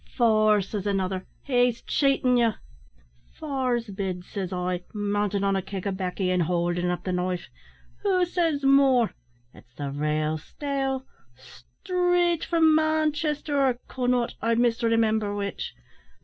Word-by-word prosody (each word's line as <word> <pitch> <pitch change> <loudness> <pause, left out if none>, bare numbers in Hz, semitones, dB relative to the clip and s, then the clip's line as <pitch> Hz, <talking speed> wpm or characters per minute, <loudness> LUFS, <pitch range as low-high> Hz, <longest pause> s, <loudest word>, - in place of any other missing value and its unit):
"`Four,' 215 -4 +4
says 205 0 -4
another; 190 -2 -1 0.2
`he's 245 -2 +2
chaitin' 270 -3 +2
ye.' 235 -2 +3 0.9
"`Four's 255 -5 -1
bid,' 190 -2 -4
says 195 -3 -5
I, 180 -1 -2
mountin' 205 -1 0
on 195 0 +2
a 190 - 0
keg 190 0 -6
o' 200 - 0
baccy, 185 0 -2
and 180 -1 +2
howldin 175 +1 0
up 180 - -2
the 185 - -2
knife; 180 0 -2 0.5
`who 370 -3 +3
says 330 -5 0
more? 270 -4 +4 0.4
It's 120 0 -19
the 140 -1 -4
rale 155 +2 -1
steel, 270 - -3 0.3
straight 350 - -1
from 325 -2 +4
Manchester 310 -2 +1
or 260 -2 +2
Connaught, 250 -2 0
I 230 0 +2
misremimber 225 -3 +1
which. 200 -1 -4
220 Hz, 135 wpm, -26 LUFS, 185-275 Hz, 0.9 s, `Four